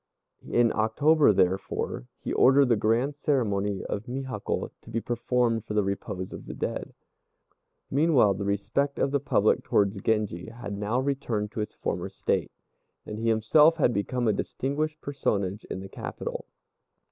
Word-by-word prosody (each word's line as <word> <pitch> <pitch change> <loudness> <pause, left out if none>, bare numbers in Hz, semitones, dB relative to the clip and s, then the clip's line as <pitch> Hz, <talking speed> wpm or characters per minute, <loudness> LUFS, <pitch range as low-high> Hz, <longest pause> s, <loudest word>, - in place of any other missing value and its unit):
In 120 -2 +3
October, 140 +7 +4
therefore, 90 -9 0
he - - -4
ordered 135 0 +5
the 120 - +5
grand 115 +7 +1
ceremony 105 -9 0
of 105 +2 -4
Mihakkô 130 -4 -3
to - - -15
be 115 0 -1
performed 120 -1 0
for 105 - -5
the 105 - +3
repose 95 -1 -4
of - - -9
the - - -6
dead. - - -4 1.0
Meanwhile 140 -8 +4
the 100 +1 -4
respect 105 +8 -1
of 135 - +1
the 140 - +2
public 110 -6 +2
towards 100 -1 +1
Genji 105 -6 0
had 110 -3 -7
now 105 +5 -1
returned 120 -6 -1
to 110 - -3
its 105 - -5
former - - -3
state, - - -1 0.5
and 105 0 -6
he 115 0 0
himself 150 +9 +5
had 130 -6 +3
become 120 +4 -1
a 110 - +4
distinguished 150 +8 -2
personage 100 -8 -2
in 95 - -5
the 95 - -7
capital. - - -6
115 Hz, 160 wpm, -27 LUFS, 100-135 Hz, 1.0 s, ordered